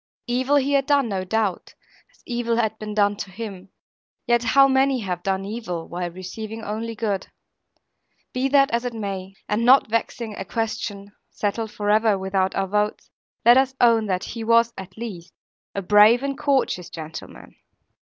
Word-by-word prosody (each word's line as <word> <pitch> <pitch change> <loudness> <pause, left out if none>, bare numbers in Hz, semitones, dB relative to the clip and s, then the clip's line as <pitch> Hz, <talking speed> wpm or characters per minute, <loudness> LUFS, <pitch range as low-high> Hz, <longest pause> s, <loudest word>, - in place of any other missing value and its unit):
Evil 255 +3 +1
he 285 0 +2
had 275 -1 +2
done, 280 -5 +3
no 190 -2 -2
doubt, 205 0 -2 0.4
as - - -29
evil 240 -1 -1
had 220 -2 0
been 210 -1 -6
done 205 -1 +3
to 195 - -6
him; 195 -2 -8 0.6
yet 240 -1 +3
how 275 +4 +5
many 265 -1 +2
have 180 -3 -3
done 195 +1 -1
evil, 195 -6 -5
while 175 0 -4
receiving 215 +5 -7
only 225 +2 -4
good! 205 -4 -2 1.1
Be 255 +1 0
that 275 0 +4
as 235 +1 0
it 245 -2 -4
may; 195 -3 -5
and 210 +3 0
not 250 -2 +5
vexing 230 -1 -2
a 195 - -5
question 205 -1 -4 0.2
(settled 220 +2 -2
for 205 0 -1
ever 215 -1 +3
without 190 0 -1
our 195 - 0
votes), 210 +2 -1 0.3
let 240 +2 +8
us 265 0 0
own 230 -3 +4
that 185 -2 -1
he 230 -1 -6
was, 230 +1 +4
at 190 0 -10
least, 185 -7 -7 0.4
a 200 - -2
brave 210 +6 +6
and 280 0 -2
courteous 265 - 0
gentleman. 160 -1 -9
220 Hz, 170 wpm, -23 LUFS, 195-240 Hz, 1.1 s, let